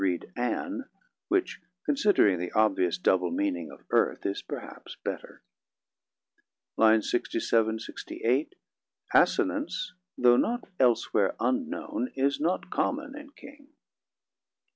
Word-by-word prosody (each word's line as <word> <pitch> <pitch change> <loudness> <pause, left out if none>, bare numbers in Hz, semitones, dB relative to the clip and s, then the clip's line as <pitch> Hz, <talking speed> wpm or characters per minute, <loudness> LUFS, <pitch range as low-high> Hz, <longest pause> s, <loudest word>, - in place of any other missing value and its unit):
read 90 -3 -1
'An', 255 - -3 0.4
which, 375 -1 0 0.2
considering 205 - +3
the 90 0 -4
obvious 95 -5 +2
double 90 0 +2
meaning 85 -4 -1
of - - -14
'earth', - - +2
is 100 - -2
perhaps - - -8
better.] - - -6 1.3
[Lines: 110 -1 +4
67 115 -2 +1 0.5
8 130 - +1 0.6
Assonance, - - +2 0.2
though 120 -1 +5
not 240 - 0
elsewhere 115 -5 +2
unknown, 260 +1 -2
is 140 +1 +1
not 175 +3 -1
common 285 0 -1
in 295 0 -10
King. 285 -1 -14
125 Hz, 105 wpm, -28 LUFS, -, 1.3 s, though